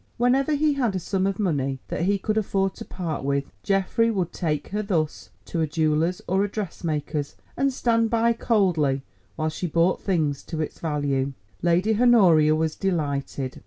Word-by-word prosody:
Whenever 265 +5 +2
he 300 +1 +2
had 245 -8 0
a - - 0
sum 190 +2 -1
of 195 -1 -2
money 140 -9 0
that 170 - -1
he 200 +1 +2
could 215 +2 -2
afford 195 -2 0
to - - -8
part 170 -6 -4
with, 140 0 0 0.2
Geoffrey 195 +4 +1
would 190 -6 -1
take 150 -5 -2
her 210 +2 -1
thus 170 -7 -2 0.2
to 165 - -2
a 160 - +1
jeweller's 155 +3 0
or 190 +2 +2
a 205 - -1
dressmaker's, 160 -7 -3 0.2
and 275 0 +1
stand 230 -3 +1
by 230 +1 +3
coldly 175 - +1 0.3
while 155 - -1
she 165 +3 -4
bought 170 +3 +2
things 155 -7 0
to 160 - -6
its 155 - -4
value. 140 -3 -1 0.3
Lady 185 +6 +2
Honoria 175 -11 +6
was 160 0 -1
delighted. 140 -7 -2
180 Hz, 175 wpm, -24 LUFS, 155-210 Hz, 0.3 s, Honoria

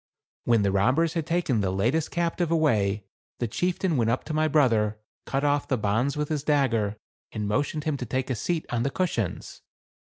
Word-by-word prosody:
When 115 -3 +3
the 100 - +2
robbers 130 +12 +2
had 165 -3 -2
taken 165 -10 +1
the 95 - 0
latest 120 +12 0
captive 170 0 -1
away, 105 -12 +1 0.3
the 120 - -1
chieftain 175 - 0
went 115 -2 +2
up 120 - 0
to 155 - -5
my 155 0 +2
brother, 115 -8 +2 0.3
cut 135 +1 -1
off 145 0 +1
the 130 - +1
bonds 115 +7 0
with 150 0 -1
his 155 -2 -1
dagger, 120 -8 +1 0.3
and 105 -2 -3
motioned 145 +8 -1
him 155 -3 -1
to 125 - -4
take 130 +3 -2
a - - 0
seat 160 +9 -2
on 120 - 0
the 135 - +1
cushions. 135 - -3
135 Hz, 195 wpm, -26 LUFS, 110-155 Hz, 0.3 s, When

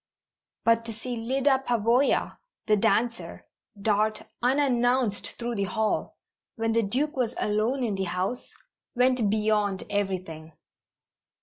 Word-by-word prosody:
But 230 0 +4
to 230 - -4
see 245 +3 -5
Lyda 265 +3 +1
Pavoya, 240 +3 +2 0.3
the 215 - +4
dancer, 230 +4 0 0.3
dart 215 +1 +1 0.2
unannounced 245 -4 +1
through 240 0 -3
the 200 -3 -1
hall, 220 +3 -1 0.4
when 225 -1 -1
the 230 +1 +3
Duke 260 +9 -1
was 250 -2 -1
alone 220 +6 0
in 225 -4 0
the 195 -1 -2
house, 185 +7 -3 0.4
went 250 -3 +3
beyond 210 -2 +1
everything. 185 -6 -3
225 Hz, 120 wpm, -27 LUFS, 205-245 Hz, 0.4 s, But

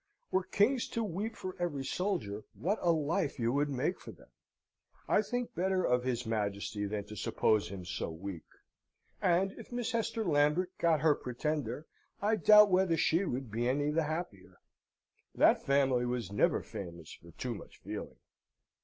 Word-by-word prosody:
Were 190 - +3
kings 230 +7 +2
to 230 - -2
weep 210 +3 -3
for 185 -1 -6
every 145 -6 -2
soldier, 130 - -2
what 200 +6 -1
a 175 - +4
life 160 +1 0
you 115 -2 +1
would 145 +1 +1
make 145 +7 -1
for - - -9
them! - - -18 0.8
I - - +4
think 245 +2 -3
better 185 +1 +1
of 125 0 +2
his 125 -1 -1
Majesty 105 -1 -2
than 105 0 -3
to 105 - -9
suppose 105 +1 +1
him 95 -2 -7
so 90 -1 -3
weak; 85 +1 -7 0.8
and, 185 +2 +3
if - - -11
Miss 240 -2 -2
Hester 225 -1 -1
Lambert 160 +3 +2
got 165 -4 +3
her 155 -1 +5
Pretender, 145 +2 -3 0.3
I 210 +2 +2
doubt 210 -1 +7
whether 180 -2 +3
she 165 +4 +2
would 125 - -3
be 120 +3 0
any 145 +3 +1
the 160 +1 +1
happier. 155 - -5 0.8
That - - +4
family 135 -3 +2
was 120 -5 -3
never 100 - +2
famous 85 -4 -8
for 85 - -15
too 125 +7 -4
much 105 - -11
feeling." - - -7
150 Hz, 170 wpm, -32 LUFS, 115-185 Hz, 0.8 s, doubt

